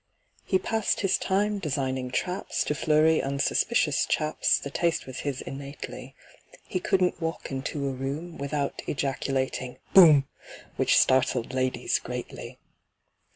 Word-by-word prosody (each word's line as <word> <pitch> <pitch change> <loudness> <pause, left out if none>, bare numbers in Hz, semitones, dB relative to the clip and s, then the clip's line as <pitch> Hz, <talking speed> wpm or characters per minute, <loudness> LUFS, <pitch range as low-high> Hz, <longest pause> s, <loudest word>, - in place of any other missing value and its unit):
He 190 - +2
passed 220 +3 -1
his 195 - +2
time 205 +2 0
designing 130 -6 -2
traps 180 +9 -2
To - - -1
flurry 155 +1 +3
unsuspicious 140 - +1
chaps— 155 0 +1
The 140 - -6
taste 170 +2 0
was 130 -1 -7
his 140 -3 -3
innately; 140 +1 -8 0.5
He 185 - -3
couldn't 185 -1 +1
walk 165 -2 -4
into 140 +1 -3
a - - -1
room 140 +6 -5
Without 140 0 -2
ejaculating 135 -2 -2 0.2
"Boom!" 155 -7 +8 0.5
Which - - +3
startled 130 -1 +2
ladies 130 0 0
greatly. - - -7
145 Hz, 125 wpm, -27 LUFS, 135-170 Hz, 0.5 s, Boom